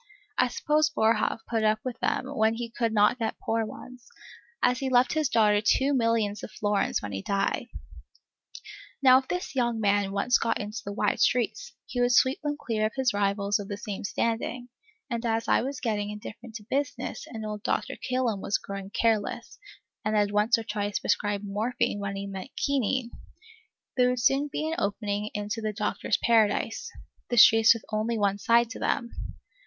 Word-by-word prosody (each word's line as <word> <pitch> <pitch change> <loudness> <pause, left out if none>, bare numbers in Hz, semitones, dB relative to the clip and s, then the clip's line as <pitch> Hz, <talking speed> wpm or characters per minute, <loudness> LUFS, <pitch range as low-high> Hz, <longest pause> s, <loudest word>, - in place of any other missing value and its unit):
I 250 - +3
suppose 300 +4 +1
Boerhaave 225 -3 +1
put 225 -2 0
up 215 0 +3
with 250 -2 -4
them - - 0
when 225 -5 +1
he 230 0 -5
could 230 -1 -1
not 210 +3 +3
get 225 -1 -2
poor 225 0 -1
ones, 250 +2 -11 0.5
as 250 0 +3
he 270 - -1
left 250 0 +3
his 310 -3 +1
daughter 210 -2 +4
two 270 +6 +2
millions 230 -4 +1
of - - -7
florins 205 -2 0
when 105 - -5
he 95 -1 -4
died. 200 - -1 1.4
Now 260 -1 +8
if 265 - -11
this 360 -4 -3
young 240 -3 +1
man 205 -2 +2
once 220 +5 +2
got 230 0 0
into 210 +2 -5
the 200 - -5
wide 200 - 0
streets, 480 - +1
he 245 - -3
would 245 0 +3
sweep 260 +2 +3
them 295 -1 -2
clear 215 -2 0
of 220 - -10
his 265 -2 +1
rivals 200 0 +1
of 200 - -6
the 205 - -5
same 205 -2 -6
standing; 230 +5 -2 0.4
and 235 -3 -3
as 230 0 -1
I - - +3
was 270 +2 -4
getting 210 -4 -1
indifferent 210 +2 -9
to 215 - -7
business, 280 -1 -3
and 220 -2 -7
old 210 -1 -5
Dr. 275 +5 -1
Kilham 250 -6 -1
was 195 - 0
growing 195 -1 -7
careless, 220 -1 -1 0.4
and 215 0 0
had 205 -1 +2
once 210 +3 +3
or 225 - -4
twice 205 -2 -2
prescribed 205 -1 -1
morphine 205 +1 -1
when 200 -1 -3
he 195 0 -4
meant 195 +3 -7 0.2
quinine, 260 -3 0 0.8
there 250 -1 +4
would 250 0 -1
soon 275 +4 +2
be 310 - -2
an 320 - -2
opening 205 0 -2
into 210 +2 -3
the 215 -1 -2
Doctor's 210 0 -1
Paradise, 230 - +1 0.4
the 240 - -1
streets 225 +1 +8
with 230 - -8
only 220 +2 -1
one 200 -1 +1
side 235 +2 +3
to - - -7
them. 235 - -1
225 Hz, 190 wpm, -27 LUFS, 205-250 Hz, 1.4 s, Now